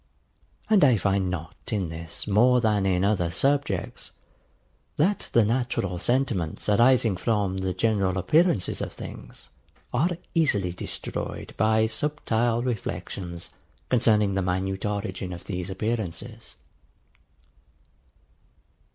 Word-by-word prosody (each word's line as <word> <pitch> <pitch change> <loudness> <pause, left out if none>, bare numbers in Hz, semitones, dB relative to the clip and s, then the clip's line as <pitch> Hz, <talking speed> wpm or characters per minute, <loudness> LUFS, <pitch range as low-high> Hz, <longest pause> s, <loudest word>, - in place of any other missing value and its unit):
And 210 -5 +5
I 130 -5 +6
find 95 -1 +1
not 85 -3 -5 0.2
in 95 -6 -1
this 80 0 -6
more 120 +5 +4
than 105 -4 +2
in 90 -1 +2
other 95 -5 +1
subjects, 135 - 0 0.9
that 195 +7 +1
the 115 -2 +4
natural 110 -6 -1
sentiments 120 -8 0
arising 115 0 +4
from 100 -2 0
the 95 0 -1
general 100 -3 +1
appearances 150 - +2
of - - -3
things - - -10 0.4
are 145 +8 +2 0.2
easily 105 - +2
destroyed 90 - -5
by 110 0 +3
subtile 120 -2 0
reflections 90 -6 -4 0.4
concerning 110 -5 +3
the 95 - 0
minute 95 +2 -1
origin 95 -2 -3
of 85 +1 -9
these 90 -2 -4
appearances. 110 +2 -4
105 Hz, 110 wpm, -26 LUFS, 95-120 Hz, 0.9 s, I